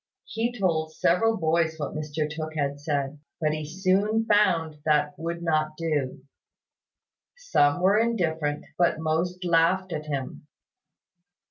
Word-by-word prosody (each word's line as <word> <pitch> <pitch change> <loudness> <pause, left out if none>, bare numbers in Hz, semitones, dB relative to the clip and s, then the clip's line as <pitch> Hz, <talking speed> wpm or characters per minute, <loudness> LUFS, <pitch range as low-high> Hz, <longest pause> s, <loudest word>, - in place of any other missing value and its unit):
He 235 +2 -2
told 160 -4 0
several 225 +6 +2
boys 160 -1 +1
what 150 -2 -4
Mr 155 0 -2
Tooke 155 +1 -6
had 140 -1 -1
said: 145 -1 -2 0.2
but 155 -2 +1
he 155 0 -3
soon 195 +7 +1
found 170 -8 +2
that 150 -1 +2
would 170 +1 -4
not 155 -2 0
do. 145 -5 -2 1.1
Some 180 - +2
were 195 +3 +4
indifferent, 160 -10 0
but 175 -3 +3
most 170 +3 -1
laughed 175 +2 +2
at 155 -1 -5
him. 140 0 -5
160 Hz, 130 wpm, -26 LUFS, 150-185 Hz, 1.1 s, were